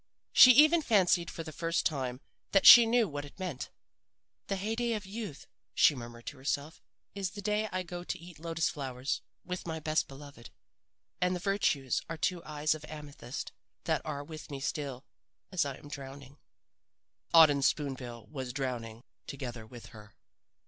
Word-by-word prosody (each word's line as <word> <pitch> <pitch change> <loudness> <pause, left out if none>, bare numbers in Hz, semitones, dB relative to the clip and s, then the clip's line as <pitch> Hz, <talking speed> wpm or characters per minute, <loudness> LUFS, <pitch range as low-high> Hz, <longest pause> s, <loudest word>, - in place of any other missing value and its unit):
"She 255 - +10
even 310 +5 +6
fancied 185 - +3
for 165 - -6
the 160 - -8
first 165 +2 -1
time 130 -4 -2 0.3
that 195 - +4
she 235 -1 +11
knew 230 -1 +3
what 145 -3 -5
it 145 - -13
meant. 180 -9 -5 0.8
"'The 195 - -1
hey 205 +3 -2
day 235 0 0
of 210 -2 -4
youth,' 200 -6 -7 0.3
she - - +6
murmured 120 -2 -9
to 145 - -7
herself, 145 +3 -3 0.3
'is 195 -2 -3
the 205 +3 -9
day 210 +1 0
I 185 0 -2
go 175 0 -7
to 185 - -3
eat 170 -2 -13
lotus 165 0 -1
flowers 135 -3 -3 0.2
with 180 -1 -5
my 160 -1 -3
best 155 0 0
beloved 140 -4 -12 0.7
and 180 0 +1
virtues 170 - 0
are 165 - -4
two 175 +1 -1
eyes 150 0 0
of 155 -1 -8
amethyst 145 -5 -7 0.3
that - - 0
are 145 -2 -4
with 155 +1 -10
me 140 -2 -5
still 140 -2 -4 0.5
as 180 -4 +1
I 140 -2 -4
am 145 - -14
drowning.' 140 -1 -9 0.9
"Auden 150 -4 +7
Spoon 140 0 +1
bill 120 -3 -9
was 130 -1 -6
drowning 120 -4 -4 0.2
together 120 -5 -6
with 120 +1 -12
her. 105 -1 -14
150 Hz, 170 wpm, -31 LUFS, 135-180 Hz, 0.9 s, she